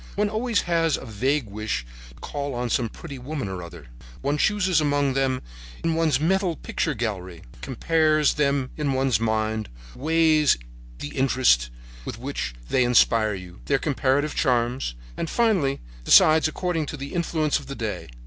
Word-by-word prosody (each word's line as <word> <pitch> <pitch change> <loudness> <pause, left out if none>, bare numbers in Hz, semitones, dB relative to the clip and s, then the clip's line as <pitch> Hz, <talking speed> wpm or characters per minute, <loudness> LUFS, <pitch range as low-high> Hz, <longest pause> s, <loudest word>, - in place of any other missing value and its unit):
One 205 +1 +1
always 225 0 0
has 165 -3 +1
a - - -9
vague 130 +5 0
wish 105 - -4 0.2
to - - -18
call 140 - -5
on 120 -1 -2
some 120 -3 +1
pretty 140 0 -9
woman 135 -1 -4
or 95 -2 -5
other. 85 -3 -10 0.4
One 145 +1 -1
chooses 190 -5 +2
among 145 -2 +1
them 130 -1 0 0.4
in 165 - +1
one's 160 -5 +2
mental 180 +2 +1
picture 155 0 -2
gallery, 95 -7 -4 0.2
compares 155 +2 +2
them 140 -3 0
in 145 -3 0
one's 130 -3 +2
mind, 110 -1 -1 0.2
weighs 155 0 +3 0.4
the 145 - -6
interest 130 - +2 0.3
with - - -6
which - - -4
they 130 - +2
inspire 115 -3 +3
you, 90 -1 -10
their 140 - +2
comparative 140 +1 0
charms 120 - 0 0.2
and 165 - -3
finally 195 -13 +1 0.2
decides 155 - +6
according 165 -1 -2
to 150 - -5
the 140 0 -7
influence 160 -3 0
of 140 - -13
the 140 - -6
day. 110 - -4
140 Hz, 160 wpm, -24 LUFS, 115-155 Hz, 0.4 s, decides